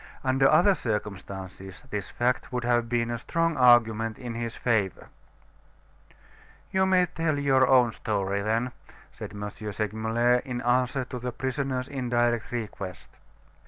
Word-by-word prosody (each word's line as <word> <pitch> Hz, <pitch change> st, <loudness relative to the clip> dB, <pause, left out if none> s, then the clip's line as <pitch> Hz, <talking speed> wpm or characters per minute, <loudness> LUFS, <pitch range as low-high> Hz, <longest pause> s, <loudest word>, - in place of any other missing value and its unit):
Under 135 Hz, +1 st, +3 dB
other 195 Hz, +3 st, +5 dB
circumstances, 95 Hz, -, -5 dB
this 105 Hz, -2 st, -3 dB
fact 125 Hz, +2 st, -1 dB
would 125 Hz, -1 st, -2 dB
have 120 Hz, -1 st, +1 dB
been 120 Hz, -1 st, 0 dB
a 120 Hz, -, -3 dB
strong 165 Hz, +5 st, 0 dB
argument 115 Hz, -4 st, +4 dB
in 120 Hz, -3 st, -6 dB
his 115 Hz, 0 st, -4 dB
favor. 105 Hz, -6 st, 0 dB, 1.6 s
"You 190 Hz, 0 st, +2 dB
may 185 Hz, -1 st, +4 dB
tell 165 Hz, -3 st, -1 dB
your 135 Hz, -2 st, +3 dB
own 125 Hz, -3 st, +5 dB
story, 100 Hz, -3 st, -2 dB
then," 115 Hz, +4 st, 0 dB, 0.4 s
said -, -, -8 dB
M. 105 Hz, 0 st, -5 dB
Segmuller 110 Hz, +4 st, 0 dB
in 125 Hz, -1 st, -4 dB
answer 125 Hz, +2 st, +1 dB
to 125 Hz, 0 st, -6 dB
the 125 Hz, +1 st, -4 dB
prisoner's 130 Hz, 0 st, -2 dB
indirect 120 Hz, -4 st, 0 dB
request. 105 Hz, -6 st, -6 dB
120 Hz, 135 wpm, -27 LUFS, 110-130 Hz, 1.6 s, other